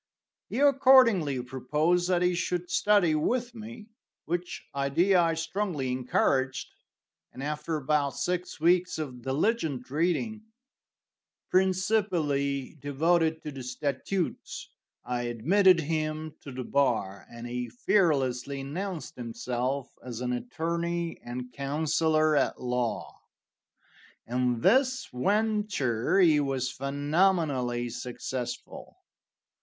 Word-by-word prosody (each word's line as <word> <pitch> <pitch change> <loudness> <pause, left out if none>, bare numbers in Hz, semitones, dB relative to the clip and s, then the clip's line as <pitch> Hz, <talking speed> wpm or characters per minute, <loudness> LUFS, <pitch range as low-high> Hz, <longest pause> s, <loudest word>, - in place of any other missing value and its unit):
He - - -4
accordingly 255 - +5
proposed 150 +8 0
that 180 -1 +2
he 180 0 +3
should 175 0 -2
study 200 -6 +3
with 240 +10 0
me, 225 -1 -9 0.4
which 175 +2 -4
idea 170 +7 +3
I 165 -1 +2
strongly 165 -5 -2
encouraged, 130 +1 0 0.6
and 130 - -8
after 150 +2 -2
about 145 -1 0
six 180 -1 -2
weeks 175 +3 +3
of 130 -6 -5
diligent 140 - -1
reading, 180 +8 0 1.1
principally 180 -9 +1
devoted 160 +3 +1
to 150 - -5
the 135 -2 -8
statutes, 140 +8 -3 0.3
I 120 0 -2
admitted 170 - +4
him 155 0 -2
to 140 - -9
the 130 0 -5
bar, 115 -8 0
and 120 0 -9
he 125 0 -4
fearlessly 140 - +1
announced 170 +5 -5
himself 125 +3 -3
as 120 -3 -6
an 125 0 -1
attorney 170 +6 -3
and 125 +1 -6
counselor 155 +2 +1
at 145 - +1
law. 125 -2 -2 1.1
In 125 -1 0
this 260 - +3
venture 195 - +1
he 160 -5 +5
was 135 -3 -1
phenomenally 140 -4 0
successful. 120 0 -6
150 Hz, 105 wpm, -28 LUFS, 130-180 Hz, 1.1 s, accordingly